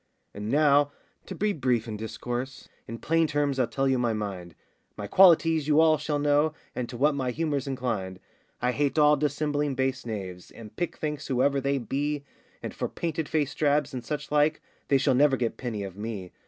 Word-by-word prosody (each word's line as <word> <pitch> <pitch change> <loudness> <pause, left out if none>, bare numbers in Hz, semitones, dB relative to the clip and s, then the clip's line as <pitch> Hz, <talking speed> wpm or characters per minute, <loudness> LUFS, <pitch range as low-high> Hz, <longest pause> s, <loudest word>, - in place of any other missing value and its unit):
And 105 +1 -5
now, 145 +1 +4 0.4
to - - -6
be 210 0 0
brief 125 - 0
in 110 - -4
discourse, 120 +4 -5 0.2
In 115 - -6
plain 165 +5 +1
terms 145 -2 0
I'll 125 - +2
tell 135 +3 -1
you 130 -1 +2
my 120 -2 +1
mind; 95 -6 -5 0.4
My 105 - -5
qualities 165 - +5
you 150 - +3 0.2
shall 150 0 -2
all - - 0
know, 145 +1 +2 0.2
And 125 -2 -4
to 120 - -7
what 145 +4 +3
my 130 -3 -2
humour's 145 0 -2
inclined: 115 -9 -3 0.4
I 125 - +3
hate 145 +3 -1
all 150 0 +6
dissembling 145 0 -1
base 130 0 -1
knaves 95 -6 -6
And 110 -2 -12
pickthanks 155 -4 -3
whoever 135 +1 +1
they 140 +1 0
be, 140 +4 -2 0.4
And - - -5
for - - -3
painted 160 -2 -3
faced 150 -4 -1
drabs, 145 -2 +2
and 125 -2 -5
such 150 -1 -5
like, 150 +1 +3 0.3
They 140 - +4
shall 130 - +2
never 135 +1 +4
get 120 -2 -2
penny 115 -5 -4
of 95 -2 -7
me. 105 -3 -6
135 Hz, 195 wpm, -27 LUFS, 115-150 Hz, 0.4 s, all